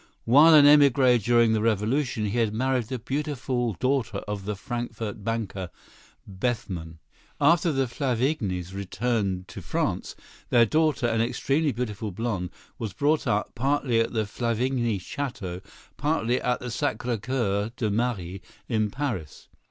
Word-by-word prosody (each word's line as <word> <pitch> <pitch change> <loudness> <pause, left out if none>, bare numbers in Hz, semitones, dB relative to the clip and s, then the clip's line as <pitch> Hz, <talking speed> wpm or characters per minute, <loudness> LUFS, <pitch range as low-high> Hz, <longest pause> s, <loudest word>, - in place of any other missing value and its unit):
While 150 +7 +7
an 145 -2 +8
émigré 135 -4 +6
during 120 -1 +4
the 110 - +1
revolution, 115 +2 0
he 105 +4 -1
had 110 -2 +1
married 130 0 +1
the 130 +3 -4
beautiful 130 -2 -2
daughter 130 -4 0
of 100 -2 -4
the 105 0 -2
Frankfort 115 -2 -5
banker, 100 -5 -3 0.6
Bethman. 95 -6 -3 0.4
After 165 +3 +4
the 135 -2 +1
Flavignys 120 - -1
returned 100 -2 -2
to - - -8
France, - - -2 0.3
their 120 -1 +5
daughter, 155 +1 +1
an 115 -1 +1
extremely 140 +6 +1
beautiful 110 -3 -4
blonde, 100 -3 -3 0.3
was 110 -5 -4
brought 150 - +1
up, 105 +1 0
partly 135 -2 +1
at 115 - +1
the 110 -2 0
Flavigny 120 +1 -1
château, 95 -5 -5 0.4
partly 140 -5 0
at 125 0 0
the 125 - -5
Sacré 115 +1 -2
Coeur 110 -5 -1
de 110 -3 0
Marie, 100 -5 -2 0.3
in 110 -3 0
Paris. 110 - -5
115 Hz, 140 wpm, -26 LUFS, 105-130 Hz, 0.6 s, an